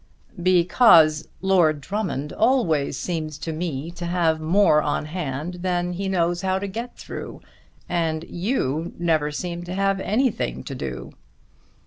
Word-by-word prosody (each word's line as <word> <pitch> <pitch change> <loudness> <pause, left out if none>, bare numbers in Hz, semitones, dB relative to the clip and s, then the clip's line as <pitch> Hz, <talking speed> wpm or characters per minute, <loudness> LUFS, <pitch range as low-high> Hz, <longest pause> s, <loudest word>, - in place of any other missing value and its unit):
"Because 175 -3 +5
Lord 175 -6 +3
Drummond 175 -5 -3
always 190 - +2
seems 155 -1 -3
to 160 +1 -4
me 160 -1 -4
to 175 0 -6
have 165 -3 +1
more 160 -1 +4
on 150 0 -1
hand 155 +1 -4
than 180 -1 -1
he 195 +2 -3
knows 175 -1 +1
how 190 -1 0
to 195 - -3
get 230 +5 -6
through, - - -7 0.5
and 165 -2 -1
you 170 - -2
never 160 -3 +1
seem 175 +3 -4
to 180 +1 -5
have 195 0 +1
anything 205 - 0
to - - -6
do." 65 -3 -6
175 Hz, 140 wpm, -23 LUFS, 155-190 Hz, 0.5 s, Because